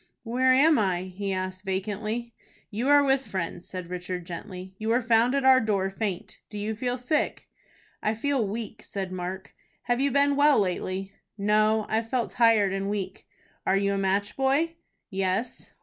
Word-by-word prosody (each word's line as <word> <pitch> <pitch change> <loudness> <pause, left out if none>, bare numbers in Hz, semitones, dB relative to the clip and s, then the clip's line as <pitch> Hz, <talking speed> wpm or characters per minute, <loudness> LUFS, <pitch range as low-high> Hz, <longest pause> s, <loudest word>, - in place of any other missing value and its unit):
"Where 255 +3 +2
am 290 +3 +5
I?" 185 -2 -1
he 200 0 -2
asked, 185 0 -3
vacantly. 215 +4 -3 0.4
"You 225 +5 -2
are 290 0 +6
with 270 -1 +1
friends," 175 -2 -4
said 180 -2 -6
Richard, 180 0 -4
gently. 180 +2 -8
"You 220 +1 -2
were 235 +2 +2
found 230 +3 +3
at 275 -1 +1
our 260 -1 +7
door 200 -4 0
faint. 195 -3 -4
Do 210 - -7
you 210 +2 -2
feel 245 +2 -2
sick?" 255 +5 -1 0.5
"I 215 +1 0
feel 260 -1 0
weak," 220 +1 -5
said 190 -2 -5
Mark. 185 +1 -5 0.3
"Have 245 +1 0
you 280 - +3
been 280 +1 +3
well 290 0 +5
lately?" 190 0 -2 0.3
"No, 215 +1 +2
I've 225 +1 -1
felt 245 -2 -1
tired 225 -5 +4
and 195 0 -2
weak." 205 -2 -4 0.4
"Are 195 - +2
you 200 0 +1
a - - -1
match 195 +1 0
boy?" 275 +5 +1 0.4
"Yes." 195 +5 -2
215 Hz, 175 wpm, -27 LUFS, 190-245 Hz, 0.5 s, our